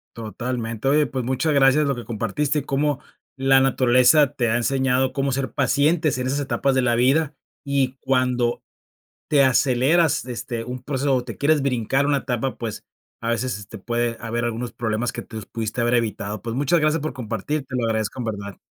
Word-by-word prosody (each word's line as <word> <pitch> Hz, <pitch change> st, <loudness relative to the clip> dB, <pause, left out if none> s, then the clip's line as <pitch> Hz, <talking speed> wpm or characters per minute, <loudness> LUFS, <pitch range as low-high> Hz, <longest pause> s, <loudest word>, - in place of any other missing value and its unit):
Totalmente. 115 Hz, +1 st, -4 dB
Oye, 150 Hz, +2 st, +4 dB
pues 130 Hz, -3 st, -3 dB
muchas 130 Hz, +5 st, 0 dB
gracias 140 Hz, +2 st, +4 dB
lo 140 Hz, -1 st, 0 dB
que 120 Hz, -, -7 dB
compartiste, 120 Hz, +7 st, -1 dB
y -, -, -4 dB
cómo 145 Hz, 0 st, 0 dB, 0.4 s
la 135 Hz, 0 st, +4 dB
naturaleza 130 Hz, +2 st, +4 dB
te 120 Hz, -2 st, 0 dB
ha 115 Hz, -, +2 dB
enseñado 130 Hz, +1 st, +1 dB
cómo 135 Hz, 0 st, 0 dB
ser 135 Hz, 0 st, -2 dB
pacientes 145 Hz, +2 st, +2 dB
en 125 Hz, -, -2 dB
esas 140 Hz, +2 st, -1 dB
etapas 135 Hz, 0 st, 0 dB
de 130 Hz, -, +3 dB
la 120 Hz, -1 st, +2 dB
vida, 140 Hz, +5 st, +2 dB, 0.3 s
y 135 Hz, -2 st, 0 dB
cuando 125 Hz, -2 st, 0 dB, 0.7 s
te 145 Hz, -2 st, +5 dB
aceleras, 135 Hz, +5 st, +3 dB
este, 120 Hz, -2 st, -5 dB
un 125 Hz, +1 st, -6 dB
proceso 135 Hz, 0 st, 0 dB
o 125 Hz, -1 st, 0 dB
te 115 Hz, -4 st, -7 dB
quieres 150 Hz, 0 st, +3 dB
brincar 135 Hz, +1 st, +1 dB
una 145 Hz, -1 st, +2 dB
etapa, 125 Hz, 0 st, -2 dB
pues 115 Hz, -3 st, -5 dB, 0.4 s
a 115 Hz, -, -3 dB
veces, 115 Hz, 0 st, -1 dB
este, 100 Hz, -1 st, -10 dB
puede 120 Hz, +3 st, -1 dB
haber 115 Hz, 0 st, -2 dB
algunos 120 Hz, +1 st, -3 dB
problemas 115 Hz, +1 st, -2 dB
que -, -, -6 dB
te 110 Hz, -, -11 dB
los 110 Hz, -2 st, -7 dB
pudiste 115 Hz, +1 st, -4 dB
haber 120 Hz, +1 st, +2 dB
evitado. 110 Hz, -3 st, -2 dB
Pues, 115 Hz, 0 st, -4 dB
muchas 145 Hz, +5 st, +2 dB
gracias 155 Hz, +1 st, +2 dB
por 155 Hz, -, -3 dB
compartir, 125 Hz, +5 st, -3 dB
te 130 Hz, -1 st, -5 dB
lo 125 Hz, -, 0 dB
agradezco 110 Hz, +1 st, -1 dB
en -, -, -3 dB
verdad. 100 Hz, -4 st, -5 dB
125 Hz, 195 wpm, -22 LUFS, 115-140 Hz, 0.7 s, te